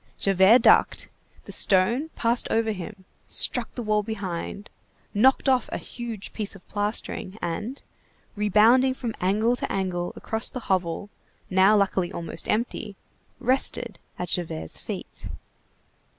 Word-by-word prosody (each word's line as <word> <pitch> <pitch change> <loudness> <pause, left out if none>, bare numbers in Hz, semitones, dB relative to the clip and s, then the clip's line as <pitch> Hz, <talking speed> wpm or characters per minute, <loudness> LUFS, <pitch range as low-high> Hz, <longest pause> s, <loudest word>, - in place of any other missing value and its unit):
Javert 195 +5 +5
ducked, - - +4 0.4
the - - -9
stone 230 +11 +2
passed 235 +1 +1
over 225 0 +1
him, 190 0 -8 0.2
struck 245 -2 +3
the 245 - -4
wall 215 -1 +2
behind, 200 -2 -5 0.5
knocked 260 +7 +4
off 260 -2 +2
a - - -2
huge 235 -4 -7
piece 210 -2 -2
of 190 - -16
plastering, 205 -1 -3
and, 210 +10 -4 0.5
rebounding 220 +6 +4
from 235 -4 -4
angle 215 +6 +2
to - - -4
angle 180 -2 -2
across 220 +1 -2
the 255 - -6
hovel, 185 0 -1 0.4
now 190 +3 +5
luckily 190 -3 +1
almost 165 -2 -6
empty, 215 -2 -2 0.4
rested 245 -4 +1 0.2
at 180 - -4
Javert's 80 - -4
feet. - - -7
210 Hz, 130 wpm, -25 LUFS, 190-235 Hz, 0.5 s, Javert